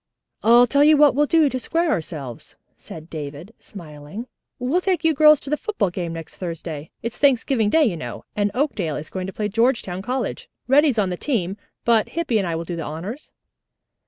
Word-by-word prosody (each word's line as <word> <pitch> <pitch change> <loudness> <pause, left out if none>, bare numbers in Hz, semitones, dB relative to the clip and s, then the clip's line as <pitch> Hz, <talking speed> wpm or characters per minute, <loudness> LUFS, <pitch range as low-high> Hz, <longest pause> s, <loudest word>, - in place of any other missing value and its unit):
"I'll 235 +2 +6
tell 280 +4 +3
you 305 0 +6
what 295 -1 +6
we'll 295 +3 +2
do 320 -2 +4
to 260 -2 -2
square 330 +5 0
ourselves," 150 - -5 0.2
said 160 0 -11
David, 155 +5 -7
smiling. 160 +3 -9 0.3
"We'll 265 +8 0
take 365 -3 0
you 320 0 +3
girls 305 0 +6
to 275 - -7
the 300 - +2
football 220 - -1
game 175 -2 -4
next 165 -1 -9
Thursday. 165 -4 -6
It's 230 +1 -5
Thanksgiving 260 -5 +2
Day, 320 +7 +4
you 220 -11 +1
know, 155 - -7
and 205 0 +1
Oakdale 210 - -1
is 155 - -7
going 185 -1 -4
to 190 - -7
play 210 - -2
Georgetown 220 -4 0
College. 250 +6 -3 0.2
Reddy's 275 -1 +4
on 195 -3 +1
the 180 - -3
team, 195 -9 -1 0.3
but 230 -2 +3
Hippy 305 -10 0
and 195 - -1
I 165 - -2
will 165 +1 -4
do 175 - -4
the 165 - -4
honors." 185 - -7
220 Hz, 200 wpm, -22 LUFS, 170-280 Hz, 0.3 s, I'll